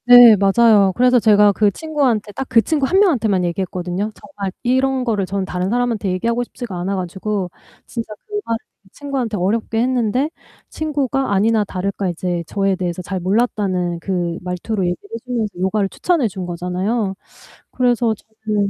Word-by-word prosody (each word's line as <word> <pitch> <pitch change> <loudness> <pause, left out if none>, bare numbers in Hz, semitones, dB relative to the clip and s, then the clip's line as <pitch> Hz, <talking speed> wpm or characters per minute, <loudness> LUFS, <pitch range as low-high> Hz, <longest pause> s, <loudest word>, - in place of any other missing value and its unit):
네 245 -2 +10
맞아요. 200 0 +4
그래서 250 0 +4
제가 210 -2 +5
그 205 +1 +3
친구한테 260 -6 -1
딱 270 - -4
그 230 - +5
친구 290 -4 0
1 380 +6 +3
명한테만 230 - +2
얘기했거든요. 180 +2 -2
정말 200 -9 -6
이런 260 +1 +1
거를 210 -6 0
저는 195 0 -2
다른 180 0 -2
사람한테 235 -3 0
얘기하고 230 +6 0
싶지가 240 -4 -7
않아 190 +3 -2
가지고 190 +1 -3 0.3
진짜 230 -2 -6 0.2
그 420 - -14
말을 230 - -1 0.3
친구한테 265 -7 -3
어렵게 220 +4 0
했는데 250 +2 +1 0.4
친구가 275 -6 -1
아니나 215 +2 +3
다를까 195 0 -3
이제 175 0 -2
'저에 195 -1 0
대해서 180 -1 -3
잘 190 +1 -3
몰랐다.'는 185 -3 0
그 175 -2 -2
말투로 180 +3 -2
얘기를 175 0 -2
해 - - -2
주면서 235 -5 -2
요가를 195 +2 +1
추천해 330 - +1
준 185 -3 -6
거잖아요. 185 +5 -2 0.6
그래서 240 -3 +1
저는 215 -2 -3
210 Hz, 375 characters per minute, -19 LUFS, 185-245 Hz, 0.6 s, 네